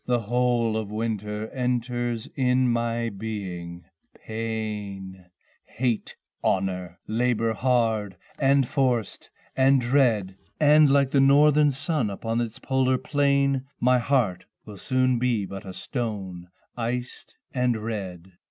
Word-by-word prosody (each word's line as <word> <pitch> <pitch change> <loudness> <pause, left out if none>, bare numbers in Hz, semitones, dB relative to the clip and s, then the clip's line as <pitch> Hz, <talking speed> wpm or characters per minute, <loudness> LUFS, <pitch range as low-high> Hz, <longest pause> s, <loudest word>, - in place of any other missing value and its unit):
The 120 -1 +1
whole 120 0 +1
of 110 -2 -4
winter 105 -1 -3
enters 120 -1 -2
in 130 -1 +2
my 115 0 -1
Being 90 -5 -6 0.3
pain, 105 -4 -5 0.4
Hate, 120 -3 -2 0.3
honor, 90 -2 -1
labour 115 0 0
hard 110 -5 0 0.2
and 135 -2 +3
forced 125 -6 -1 0.3
and 135 +1 +4
dread, 120 -7 +2 0.2
And 150 0 +6
like 140 -1 +3
the 140 - +4
northern 145 +2 +5
sun 140 -3 -1
upon 115 +4 -2
its 115 -2 -4
polar 130 -1 +1
plane 140 -2 +1
My 125 +1 +4
heart 115 -8 0 0.2
will 105 -2 -10
soon 130 0 +1
be 120 -5 +1
but 95 0 -8
a 95 - -7
stone, 95 -7 -5 0.3
iced 120 +1 -4 0.2
and 125 -3 +1
red. 95 -5 -6
115 Hz, 120 wpm, -25 LUFS, 105-130 Hz, 0.4 s, And